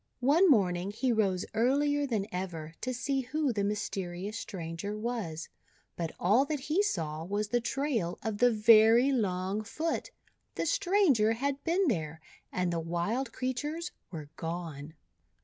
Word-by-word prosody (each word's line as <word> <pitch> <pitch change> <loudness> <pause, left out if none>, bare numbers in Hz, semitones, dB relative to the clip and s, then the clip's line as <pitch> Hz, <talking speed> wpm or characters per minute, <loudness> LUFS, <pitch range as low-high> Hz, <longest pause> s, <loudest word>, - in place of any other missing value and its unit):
One 315 +9 +5
morning 185 - +3
he 245 +5 0
rose 195 -5 +1
earlier 285 +5 +2
than 215 -6 -1
ever 170 -4 -4
to 255 - -2
see 265 +2 -1
who 275 +1 -1
the 205 -2 -1
mysterious 200 -1 -3
stranger 185 0 -5
was, 215 -9 -4 0.5
but 165 -2 -3
all 210 +9 +4
that 295 -2 -3
he 310 +8 +1
saw 160 - -2
was 205 +4 -2
the 240 +1 +1
trail 240 - -1
of 220 -2 -3
the 245 - +6
very 225 +3 +6
long 195 -3 -1
foot. 315 +9 -3 0.5
The - - -1
stranger 335 - +3
had 275 +4 -2
been 360 +3 +2
there, 160 - -1 0.3
and 180 -1 -1
the 165 - 0
wild 175 +10 -2
creatures 295 +8 -3 0.2
were 155 -5 -8
gone. 160 -3 -5
220 Hz, 150 wpm, -30 LUFS, 180-270 Hz, 0.5 s, the